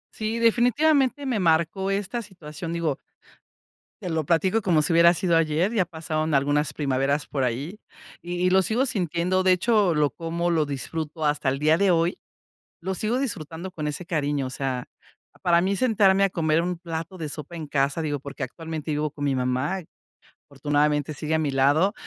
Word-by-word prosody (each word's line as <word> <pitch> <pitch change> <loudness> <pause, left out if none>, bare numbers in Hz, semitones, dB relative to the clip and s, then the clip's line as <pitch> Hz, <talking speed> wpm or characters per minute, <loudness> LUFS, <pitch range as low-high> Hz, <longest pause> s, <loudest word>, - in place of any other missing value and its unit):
Sí, 220 +1 -2
definitivamente 260 +5 +3
me 250 -5 0
marcó 170 +2 +1
esta 205 +4 -2
situación. 170 -4 -8
Digo 165 -4 -1 1.0
te 180 - -4
lo 160 -2 -1
platico 185 +8 +2
como 170 -5 +3
si 150 - 0
hubiera 170 +1 +6
sido 170 -1 +1
ayer 165 +5 +1
ya 190 -5 +2
pasaron 160 -2 -3
algunas 145 +1 +1
primaveras 140 0 0
por 135 -3 -2
allí 140 - -4 0.4
y 175 +1 -6
y 185 - +4
lo 190 +1 +5
sigo 225 +8 +1
sintiendo. 185 - 0
De 185 - +4
hecho, 200 -1 +2
lo 150 -1 +3
como 170 +1 -3
lo 160 -2 +2
disfruto 155 +3 -4
hasta 145 -2 0
el 135 +1 -2
día 155 +2 +4
de 195 -1 +3
hoy. 170 +1 +1 0.6
Lo 190 +2 -2
sigo 225 +7 -1
disfrutando 185 - -4
con 155 -4 -4
ese 150 +4 -4
cariño. 145 -6 -1
O - - -6
sea, 130 -1 -3 0.6
para 170 -1 +4
mí 195 +2 0
sentarme 195 -4 +3
a 195 - 0
comer 160 -1 +1
un 180 0 -2
plato 165 +1 -6
de 155 -3 -5
sopa 150 +4 -7
en 155 -3 -6
casa, 140 +2 0
digo, 145 -3 -2
porque 140 0 -7
actualmente 160 +3 -5
vivo 150 0 -1
con 145 -1 -7
mi 135 -2 +1
mamá. 130 +9 -1 0.7
Afortunadamente 150 0 0
sigue 155 +2 -3
a - - +3
mi 155 -2 0
lado, 145 +8 +3
165 Hz, 185 wpm, -25 LUFS, 150-190 Hz, 1.0 s, hubiera